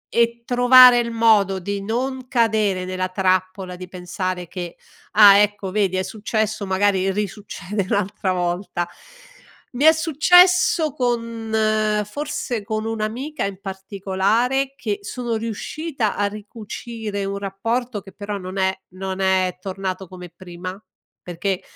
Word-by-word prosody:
e 235 0 +2
trovare 245 0 +7
il 235 -1 -2
modo 215 -4 +3
di 200 +2 -4
non 255 +4 -3
cadere 215 -6 +1
nella 185 0 -3
trappola 185 0 0
e - - -9
di 185 - -8
pensare 180 0 -4
che: 175 -1 -7 0.4
"Ah 205 -2 +9
ecco, 205 -2 0
vedi 195 -2 +1
è 185 - 0
successo 215 0 -2
magari 195 0 +1
risuccede 200 -1 -4
un'altra 200 -1 -1
volta". 175 0 -2 0.8
Mi 255 +3 -2
è 320 - +10
successo 350 +1 +4
con, 230 -4 -2 0.6
forse 275 -5 -4
con 215 +1 -3
un'amica 225 +7 -3
in 195 -1 -5
particolare, 200 +7 -1
che 210 -8 -3
sono 235 +3 -4
riuscita 230 +3 -3
a 205 0 +1
ricucire 210 0 -6
un 200 0 -3
rapporto 220 +4 -2
che 195 -1 -14
però 205 0 -5
non 185 0 -7
è 190 0 +1
non 190 +1 -5
è 190 -1 +1
tornato 190 0 -4
come 180 -1 -10
prima 180 +2 -8 0.5
perché 180 +2 -3
205 Hz, 130 wpm, -21 LUFS, 190-235 Hz, 0.8 s, è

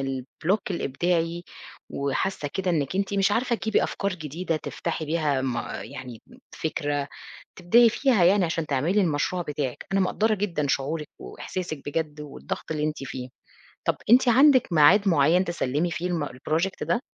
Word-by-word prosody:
الBlock 135 - -1
الإبداعي 170 +2 -1 0.5
وحاسة 145 +3 -2
كده 190 -2 0
إنِك 155 +1 -1
أنتِ 200 0 -1
مش 200 +1 +2
عارفة 240 +1 +1
تجيبي 220 -1 +1
أفكار 200 -1 -2
جديدة، 165 +1 -3
تفتحي 160 +1 -4
بيها 150 -3 0
ما 125 -3 -3
يعني 130 -4 -9 0.3
فكرة، 145 -2 -2 0.5
تبدئي 230 +7 +6
فيها 235 -6 +2
يعني 190 +1 +5
عشان 165 -1 -2
تعملي 160 +9 +1
المشروع 175 +2 0
بتاعِك. 145 -5 -4
أنا 195 - +2
مقدّرة 215 +4 +1
جدًا 170 -8 -1
شعورِك 150 +3 -1
وإحساسِك 155 - -6
بجد 150 -1 -3
والضغط 150 +2 -6
اللي 150 -1 -1
أنتِ 155 0 -1
فيه. 130 -1 -6 0.6
طَب - - +3
أنتِ 245 +1 +6
عندِك 260 - +5
ميعاد 190 +7 +6
معيّن 165 +4 +4
تسلمي 170 0 -1
فيه 175 +2 -2
الم 170 -4 -1
الProject 160 +8 -2
ده؟ 240 - +1
165 Hz, 150 wpm, -25 LUFS, 145-190 Hz, 0.6 s, تبدئي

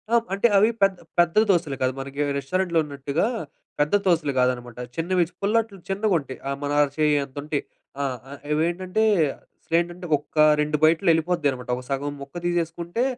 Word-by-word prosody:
ఆహ్, 230 - +4
అంటే 200 +4 +3
అవి 215 +3 +5
పెద్ద, 195 -1 +4 0.2
పెద్ద 175 +1 +3
దోసలు 165 -7 +2
కాదు. 130 0 +1
మనకి 140 +2 -5 0.2
రెస్టారెంట్‌లో 170 +4 0
ఉన్నట్టుగా 140 +4 -2 0.5
పెద్ద 150 +5 +1
దోసలు 165 -6 +2
కాదనమాట. 125 -1 0 0.2
చిన్నవి 175 +2 +1 0.2
పుల్లట్లు 215 0 0
చిన్నగుంటయి. 190 -9 -1
ఆహ్, 140 0 -2
మన 145 - -2
అర 145 - +4
చెయ్యంత 145 -3 +1
ఉంటాయి. 150 -1 -2 0.4
ఆహ్, 130 -2 -2 0.4
ఇవేంటంటే 180 +6 0 0.6
అసలేంటంటే 175 +2 -1
ఒక్క 145 - -22 0.3
2 150 0 0
బైట్‌లో 165 +4 +4
యెళ్ళిపోద్దన్నమాట. 155 -6 0
ఒక 125 - -7
సగం 140 +1 -2
ముక్క 140 +4 -11
తీసేసుకుంటే 170 +4 -1
160 Hz, 145 wpm, -24 LUFS, 140-180 Hz, 0.6 s, అవి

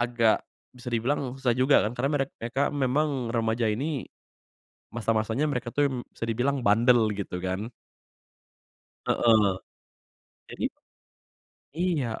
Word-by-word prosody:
agak, 120 -2 +2 0.3
bisa 125 0 -8
dibilang 125 +3 0
susah 125 -3 +1
juga 130 +3 +5
kan 110 - -3
karena 135 +4 0
merek 135 0 -1
mereka 120 +4 -1
memang 135 -2 0
remaja 115 0 0
ini, 140 +5 -2 0.9
masa-masanya 115 +4 0
mereka 125 -3 -3
tuh, 145 0 +3
mmm, 125 -2 -4
bisa - - -4
dibilang 130 +5 0
bandel 115 +2 +5
gitu 95 -3 -4
kan. 95 +6 -3 1.4
Heeh, 110 -4 +4 1.0
jadi - - -7 1.2
Iya, 170 -8 +1
120 Hz, 120 wpm, -27 LUFS, 115-135 Hz, 1.4 s, juga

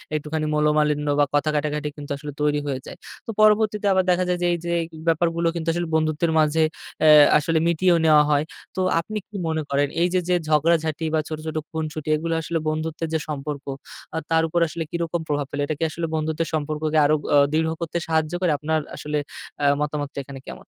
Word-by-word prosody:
একটুখানি 155 +1 -2
মনোমালিন্য 150 -1 +2
বা 145 - +5
কথা 145 +1 +2
কাটাকাটি 150 0 -1
কিন্তু 145 -1 -8
আসলে 145 +1 -7
তৈরি 150 0 +2
হয়ে 135 -2 -2
যায়। - - -9 0.3
তো - - -11
পরবর্তীতে 215 -1 +3
আবার 190 0 +3
দেখা 180 +1 +2
যায় 180 - +1
যে, - - +3
এই - - 0
যে, 170 - -2
এই - - -3 0.2
ব্যাপারগুলো 165 +1 +1
কিন্তু 165 0 -4
আসলে 175 -1 -2
বন্ধুত্বের 155 +1 +1
মাঝে 155 +1 +3 0.4
অ্যা 155 - +7 0.3
আসলে 160 +2 +1
মিটিয়েও 170 +1 +3
নেওয়া 150 -1 +6
হয়। 145 0 +3 0.3
তো 190 - -1 0.2
আপনি 215 +6 -4
কি 215 - -15
মনে 160 0 -1
করেন 140 +1 +2
এই 175 - +4
যে, 185 - +3
যে 180 - +4
ঝগড়া-ঝাঁটি 160 +1 +2
বা 160 - +3
ছোট, 155 - -4
ছোট 160 0 -3
খুনসুটি, 155 -1 -4
এগুলো 165 +2 -2
আসলে 165 +1 -2
বন্ধুত্বের 160 +1 -3
যে 160 - +2
সম্পর্ক, 145 -1 -5 0.5
আ - - -1
তার 160 0 +4
উপর 170 +2 0
আসলে 165 +1 -4
কিরকম 170 0 -2
প্রভাব 145 -1 -1
ফেলে? 145 - -2
এটা 155 - -2
কি - - -1
আসলে 165 +1 -3
বন্ধুত্বের 160 +1 -1
সম্পর্ককে 155 0 -1
আরও 155 +1 +4 0.2
অ - - +7
দৃড় 160 +1 +1
করতে 170 +1 -2
সাহায্য 160 0 0
করে, 175 -4 +2
আপনার 155 +1 0 0.2
আসলে 150 0 -3 0.4
অ্যা 145 - +2
মতামতটা 150 -1 -3
এখানে 135 0 -9
কেমন? - - -9
155 Hz, 205 wpm, -23 LUFS, 150-165 Hz, 0.5 s, অ্যা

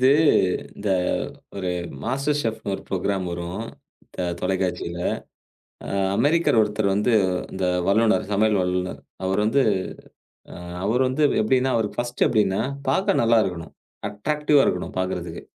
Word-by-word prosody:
இது 130 +1 +5 0.7
இந்த 100 0 -2 0.7
ஒரு 95 -2 -2 0.3
மாஸ்டர் 140 +5 0
செஃப்ன்னு 110 -5 -3
ஒரு - - -11
ப்ரோக்ராம் 95 0 -1
வரும், 85 +5 -4 0.5
த 90 - -1
தொலைக்காட்சியில. 90 -2 -2 0.9
அ - - -7 0.3
அமெரிக்கர் 160 -4 +3
ஒருத்தர் 105 -1 +1
வந்து 105 +4 +1 0.4
இந்த 95 0 -2 0.2
வல்லுநர் 110 +1 +3
சமையல் 105 0 +3
வல்லுநர், 90 -5 -2 0.3
அவரு 95 +2 +1
வந்து 135 +5 +3 1.2
அவரு 120 +5 +2
வந்து 140 +4 +1 0.2
எப்டின்னா, 130 +4 +2
அவருக்கு 110 -1 -1
ஃபர்ஸ்ட்டு 120 0 0
எப்டின்னா 100 -4 +2 0.3
பாக்க 190 +8 +2
நல்லா 115 0 +4
இருக்கணும். 90 -4 -4 0.4
அட்ராக்டிவா 150 +6 +2
இருக்கணும் 90 - -1
பாக்குறதுக்கு. 90 -2 -3
105 Hz, 125 wpm, -23 LUFS, 95-125 Hz, 1.2 s, இது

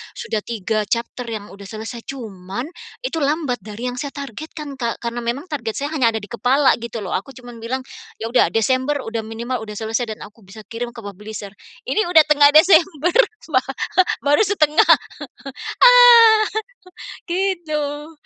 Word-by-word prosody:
sudah 220 - -3
3 215 -1 -2
chapter 235 +1 -3
yang 215 -3 -6
sudah 200 0 -11
selesai, 225 +3 -7
cuman 210 -4 -6 0.4
itu 415 -10 -2
lambat 290 -3 -1
dari 220 +3 -6
yang 245 - -9
saya 280 +1 -5
targetkan, 285 +1 -8
Kak, 235 -2 -2
karena 235 0 -3
memang 240 +6 -3
target 235 -7 -3
saya 285 +2 -3
hanya 260 -7 +3
ada - - -1
di - - -8
kepala 260 +4 +3
gitu 235 -2 -6
loh. 185 - -6
Aku 265 +8 -5
cuma 245 -1 -11
bilang, 245 +3 -4 0.4
"Ya 225 +1 -4
udah 250 - +4
Desember 260 +6 +1
sudah 225 0 -4
minimal 235 +3 -4
sudah 210 -1 -8
selesai 225 +1 -2
dan - - -23
aku 215 +2 -15
bisa 200 +4 -12
kirim 240 +1 -5
ke - - -8
publisher." 205 +1 -8 0.3
Ini 430 - 0
sudah 325 -3 +6
tengah 290 -1 +6
Desember 330 0 +4 0.4
ba 255 -2 +3 0.6
baru 290 +7 +4
setengah. 315 -6 +3 0.9
Ah 480 -3 +8 0.9
gitu. 320 -5 -2
250 Hz, 160 wpm, -20 LUFS, 225-300 Hz, 0.9 s, Ah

